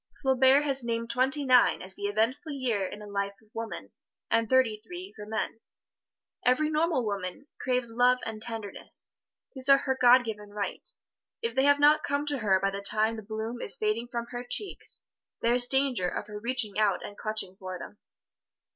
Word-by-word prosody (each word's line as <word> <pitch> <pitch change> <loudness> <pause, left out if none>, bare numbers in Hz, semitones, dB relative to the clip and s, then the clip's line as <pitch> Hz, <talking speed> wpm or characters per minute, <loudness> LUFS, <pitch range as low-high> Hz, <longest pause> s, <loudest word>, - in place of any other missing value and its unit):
Flaubert 265 +1 +4
has 275 -3 +1
named 230 0 -2
twenty 270 +3 +1
nine 250 -2 +5
as 190 +1 -4
the 205 +1 -4
eventful 230 +10 -1
year 245 -7 -1
in - - -8
the 210 - -10
life 200 -1 -3
of 220 0 -28
woman, 225 0 -6 0.4
and 230 -1 +2
thirty 255 -5 +3
three 360 - -10
for 210 -1 -10
men. 220 +1 -3 0.8
Every 305 +5 +2
normal 310 -5 +1
woman 200 +4 -4
craves 250 -2 0
love 250 +2 +3
and 220 -1 -6
tenderness 225 -3 -1 0.4
these 265 -1 0
are 275 - +8
her 265 -1 -1
God 250 +1 +7
given 210 -2 -6
right. 205 -1 -5 0.5
If 230 0 -2
they 265 +1 +3
have 285 0 +4
not 300 +1 +5
come 285 0 -1
to 290 -2 -1
her 195 -4 +2
by 195 +1 0
the 200 0 -5
time 215 +2 +2
the 220 - -7
bloom 220 +3 -5
is - - -2
fading 215 +3 -1
from 235 -1 -4
her 245 0 -5
cheeks, 390 +11 -1 0.4
there 235 +1 +3
is 245 0 +8
danger 265 -9 +1
of - - -5
her 210 0 -8
reaching 230 -3 +2
out 210 -3 +1
and 205 - -9
clutching 215 -4 -4
for 185 -1 -6
them. 205 - -11
230 Hz, 190 wpm, -28 LUFS, 210-265 Hz, 0.8 s, are